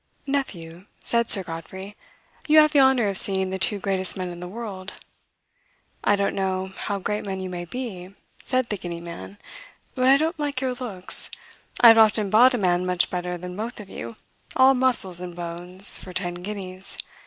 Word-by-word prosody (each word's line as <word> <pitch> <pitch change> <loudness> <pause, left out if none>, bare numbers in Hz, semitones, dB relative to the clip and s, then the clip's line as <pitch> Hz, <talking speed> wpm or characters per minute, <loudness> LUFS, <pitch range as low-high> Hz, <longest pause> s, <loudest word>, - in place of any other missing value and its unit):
"Nephew," 185 -11 -4 0.2
said 235 -1 0
Sir 195 - +7
Godfrey, 190 +5 -9 0.5
"you 310 0 +5
have 305 -1 +6
the 290 - +3
honor 265 -4 +4
of 195 -1 +4
seeing 190 -1 +3
the 190 - -4
two 205 +2 +2
greatest 190 -1 0
men 185 -1 -4
in 175 0 -9
the 180 - -7
world." 200 -2 -7 1.1
"I 205 - +3
don't 200 0 -1
know 190 -1 -2
how 205 - -3
great 210 +2 -3
men 195 -2 -5
you 185 -1 -6
may 175 -1 -5
be," 195 -4 -7 0.3
said 255 -2 0
the 210 - -2
Guinea 175 -2 -6
man, 170 +4 -10 0.6
"but 255 -1 0
I 270 +1 +6
don't 320 +2 -2
like 290 -3 -2
your 260 -1 -2
looks. 220 -8 -3 0.5
I 235 - +10
have 225 0 +7
often 215 -2 +3
bought 245 +4 +6
a - - -1
man 180 -3 +1
much 180 -1 0
better 180 0 -3
than 180 +1 -8
both 225 +4 -6
of 200 -2 -11
you, 115 0 -8 0.4
all 260 0 +6
muscles 245 -9 +3
and 180 -1 -7
bones, 175 +2 0
for 185 - -10
ten 175 -1 -2
guineas. 185 0 -2
195 Hz, 190 wpm, -23 LUFS, 180-235 Hz, 1.1 s, I